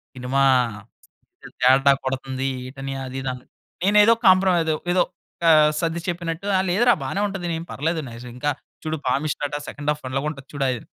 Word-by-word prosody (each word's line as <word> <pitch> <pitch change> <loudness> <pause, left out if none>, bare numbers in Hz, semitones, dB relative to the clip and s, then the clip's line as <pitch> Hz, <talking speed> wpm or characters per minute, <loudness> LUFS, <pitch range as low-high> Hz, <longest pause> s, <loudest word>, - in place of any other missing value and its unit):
Cinema 130 +2 -1 1.2
తేడా 135 +2 +6
కొడుతుంది. 130 0 -2 0.2
ఏట్టన్నయ్య 135 0 -6
అది 130 +1 -6
ఇది 130 - -3
అని. 125 0 -11 0.4
నేనేదో 210 +3 +6
కాంప్రమైజ్ 185 -4 +4 0.2
ఏదో 180 - +4 0.5
ఆహ్, 155 -2 +6
సర్ది 165 0 -1
చెప్పినట్టు, 170 +1 -4
"ఆ! - - +2
లేదురా 240 +7 +4
బానే 200 - -2
ఉంటది. 195 -3 -5
ఏం 165 - -6
పర్లేదు 160 +3 -1
నైస్. 120 +1 -10
ఇంకా 145 +4 -1 0.3
చూడు 160 0 -2
పామిస్ట్ 140 +4 -1
అటా 145 - -4
సెకండ్ 145 +1 -4
హాఫ్ 150 0 -4
అలగా 135 +2 -2
ఉంటది 135 -3 -9
చూడు" 140 -1 -1
అది. 125 -2 -2
150 Hz, 165 wpm, -23 LUFS, 135-175 Hz, 1.2 s, తేడా